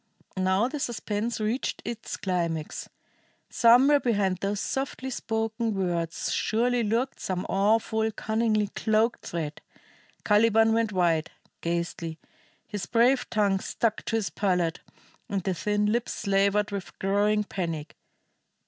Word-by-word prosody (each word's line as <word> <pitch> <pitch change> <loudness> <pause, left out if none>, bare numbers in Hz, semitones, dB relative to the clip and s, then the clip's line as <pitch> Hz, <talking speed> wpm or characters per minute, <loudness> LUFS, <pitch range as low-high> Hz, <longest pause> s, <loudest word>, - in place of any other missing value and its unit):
Now 190 +4 +2
the 295 +3 -5
suspense 230 -2 -2
reached 220 +5 -2
its 230 -1 -5
climax. 170 -5 -2 0.6
Somewhere 260 +5 +6
behind 200 -7 +1
those 200 +1 -1
softly 265 +1 -3
spoken 225 -1 -2
words 170 -3 -1
surely 240 +2 +1
lurked 230 +5 -1
some 185 0 -3
awful, 220 +2 +2
cunningly 220 -1 0
cloaked 220 +2 0
threat. 155 -3 -4 0.6
Caliban 225 +1 +4
went 225 -1 +1
white, 170 -4 +1 0.3
ghastly; 170 -1 -3 0.5
his 205 -3 -5
brave 245 +3 +3
tongue 200 -3 +2
stuck 220 +2 -1
to - - -1
his 220 -3 -1
palate, 180 -4 0 0.5
and 195 -2 -1
the 190 - 0
thin 210 +4 0
lips 235 +1 -1
slavered 200 0 +1
with 200 -2 -6
growing 205 +2 +2
panic. 165 -6 -4
210 Hz, 120 wpm, -27 LUFS, 190-225 Hz, 0.6 s, Somewhere